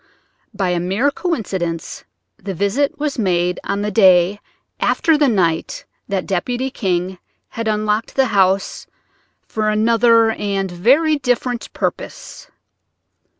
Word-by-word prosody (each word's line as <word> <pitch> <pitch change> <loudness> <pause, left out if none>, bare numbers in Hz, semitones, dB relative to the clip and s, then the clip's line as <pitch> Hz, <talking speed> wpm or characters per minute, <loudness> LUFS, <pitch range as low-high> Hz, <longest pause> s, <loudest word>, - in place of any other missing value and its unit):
By 195 -4 -2
a 175 -1 0
mere 195 +11 0
coincidence, 190 - -4 0.4
the 195 -2 -5
visit 270 - 0
was 295 -4 -3
made 180 -3 0
on 200 +1 -2
the 210 - -2
day 190 -1 +4 0.4
after 325 -3 +2
the 295 -1 +3
night 175 -8 0 0.2
that 195 -2 -2
Deputy 245 +8 -2
King 185 -4 -2 0.3
had 230 -1 -5
unlocked 215 +1 -1
the 270 - +3
house 195 0 +1 0.6
for 215 -1 -1
another 230 +1 +3
and 195 -3 -2
very 275 - +3
different 245 -2 -2
purpose. - - -5
210 Hz, 120 wpm, -18 LUFS, 185-245 Hz, 0.6 s, day